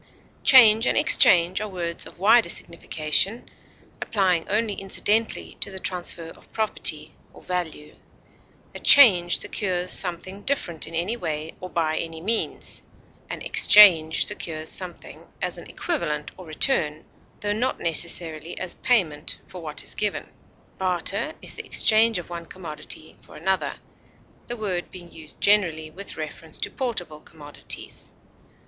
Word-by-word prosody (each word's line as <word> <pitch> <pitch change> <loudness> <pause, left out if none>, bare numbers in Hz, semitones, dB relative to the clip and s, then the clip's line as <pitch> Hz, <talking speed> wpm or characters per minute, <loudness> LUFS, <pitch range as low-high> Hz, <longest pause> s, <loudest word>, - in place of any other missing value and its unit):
Change 225 -3 +7
and - - +1
exchange 180 - +5
are 215 - -3
words 170 -3 -3
of - - -15
wider 215 +1 +4
signification, 170 +6 -1 0.5
applying 185 -6 0
only 210 +1 0
incidentally 210 +3 -1
to - - -4
the 190 - -9
transfer 175 -3 -4
of - - -16
property 155 -8 0 0.2
or - - -16
value; 160 -4 -5 0.8
a - - -8
change 185 -11 +6
secures 185 -3 -2
something 185 +2 -3
different 175 - -3
in 165 - -7
any 180 +8 -1
way 160 -5 -5
or 185 - -8
by 160 -2 -1
any 165 -1 -6
means; 220 +7 -1 0.5
an - - -6
exchange 170 -7 +6
secures 160 -6 -5
something 180 -2 -7
as - - -4
an - - -12
equivalent 150 - -3
or 185 -2 -13
return, 155 - +1 0.4
tho 205 0 -1
not 245 +5 -2
necessarily 165 0 -1
as 180 - -4
payment 170 - -1
for 180 - -11
what 155 -2 -5
is - - -4
given. 210 -1 -3 0.5
Barter 190 - -1
is - - -5
the - - -8
exchange 220 0 +4
of 175 - -6
one 170 -1 -7
commodity 160 -3 -8
for - - -15
another, 190 0 -2 0.7
the 240 - -5
word 190 -5 -3
being 175 -2 -12
used 155 -2 -13
generally 170 -7 +2
with 195 +5 -9
reference 155 0 -7
to - - -4
portable 185 - -4
commodities. 145 -2 -6
180 Hz, 140 wpm, -24 LUFS, 160-210 Hz, 0.8 s, Change